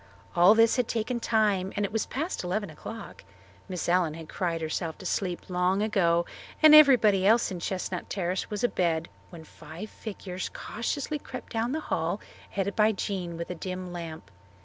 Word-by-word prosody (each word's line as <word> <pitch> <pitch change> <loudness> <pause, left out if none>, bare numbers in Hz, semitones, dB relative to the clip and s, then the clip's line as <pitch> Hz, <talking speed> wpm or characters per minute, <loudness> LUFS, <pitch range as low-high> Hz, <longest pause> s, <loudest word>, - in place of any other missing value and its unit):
All 180 +5 +7
this 230 +2 +5
had 250 -2 +1
taken 235 +2 -1
time 210 -5 +1
and 205 - 0
it - - -4
was 220 0 -1
past 315 - -3
eleven 190 +1 -2
o'clock. 225 +8 -9 0.5
Miss 180 -3 -3
Allen 175 -3 +2
had 165 -1 -9
cried 170 -2 -2
herself 160 +1 -3
to 190 - -11
sleep 180 -1 -2
long 185 +2 +1
ago 170 -5 +2 0.4
and 310 -1 +9
everybody 245 -10 +7
else 225 +3 +4
in 180 - -4
Chestnut 185 0 -3
Terrace 185 -1 -2
was 210 0 -4
abed 170 -8 +1 0.2
when 170 -2 -11
five 160 +6 -10
figures 185 -4 -6
cautiously 285 +6 -3
crept 255 -3 -9
down 230 +2 0
the 315 +3 -2
hall, - - -1 0.3
headed 200 0 -2
by 215 0 +4
Jean 185 -4 -3
with 170 +1 -5
a - - -2
dim 185 +1 -6
lamp. 165 - -7
190 Hz, 175 wpm, -28 LUFS, 175-220 Hz, 0.5 s, and